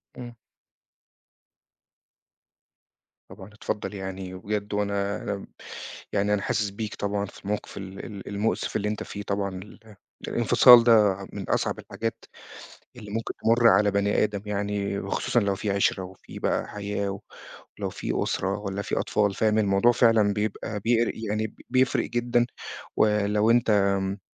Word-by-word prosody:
امم. 120 -1 -8 3.0
طبعًا 95 - -11
اتفضّل 105 0 -4
يعني، 95 -1 -6
وبجد 105 +2 -4
وأنا 100 0 -1
آمم 100 - -7 0.7
يعني 105 0 +2
أنا 105 - +1
حاسس 105 0 0
بيك 105 +1 -5
طبعًا 100 0 -2
في 100 - -14
الموقف 105 +1 -4
ال 95 -1 -7
ال 100 -3 -9
المؤسف 105 +2 -1
اللي 105 - 0
أنت 105 - -3
فيه، 100 - -7
طبعًا 100 0 -1
ال 105 +3 -11 0.3
الانفصال 120 +1 +7
ده 105 -5 +5 0.2
من 100 -3 -6
أصعب - - 0
الحاجات 115 +3 -5 0.7
اللي 105 -1 -9
ممكن 115 +1 -3
تمُر 115 +1 +5
على 105 -2 +4
بني 100 +1 +2
آدم 105 -2 -2
يعني، 100 -1 -2
وخصوصًا 100 +4 0
لو 100 -1 0
في 100 +1 -2
عِشرَة 100 -1 +1
وفي 95 0 -11
بقى - - 0
حياة، 100 -1 -3
و 100 - -6 0.6
ولو - - -3
في - - -4
أُسرَة 95 +2 -1
والّا 100 -1 -4
في - - -2
أطفال 105 -2 +1
فاهم؟ 110 +1 +2
الموضوع 100 +3 +4
فعلًا 115 -4 +4
بيبقى 105 0 -3
بيقر 115 +2 +2
يعني 110 0 -3 0.2
بيفرق 130 0 +2
جدًا، 120 0 +1 0.5
ولو 105 0 +3
أنت 120 -1 +3
آمم 100 -1 +2
105 Hz, 145 wpm, -26 LUFS, 100-110 Hz, 3.0 s, الانفصال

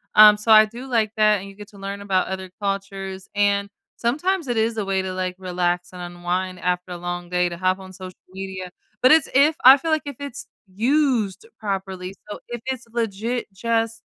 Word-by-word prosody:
Um, 210 0 +9
so 215 +2 0
I 215 0 +9
do 235 +5 -9
like 225 -4 +1
that, 215 -1 +4
and 195 +1 -9
you 195 - -13
get 205 0 -11
to 205 - -16
learn 200 +1 -5
about 190 -2 +1
other 190 -1 -5
cultures, 195 -1 -4
and 200 0 +1 0.3
sometimes 310 +7 0
it 240 - -1
is 225 +1 +1
a 210 - -1
way 195 -1 0
to, 190 0 -4
like, 185 0 -3
relax 180 -1 -1
and 180 - -8
unwind 175 +1 -3
after 180 +1 -2
a 175 - -4
long 175 0 -5
day 180 0 +1
to 170 - -7
hop 185 +1 +1
on 190 0 -11
social 185 -1 -9 0.2
media, 190 -1 -6 0.3
but 255 - +6
it's 315 -2 +5
if 290 +4 +5
I 265 +2 +10
feel 325 +4 -4
like 310 -1 +1
if 285 -4 -7
it's 280 -4 -7 0.2
used 240 - 0
properly, 190 -3 -4 0.2
so 210 - -6
if 240 -1 -6
it's 260 -2 -3
legit, 230 +1 -2
just 225 +2 -1
200 Hz, 210 wpm, -23 LUFS, 185-230 Hz, 0.3 s, I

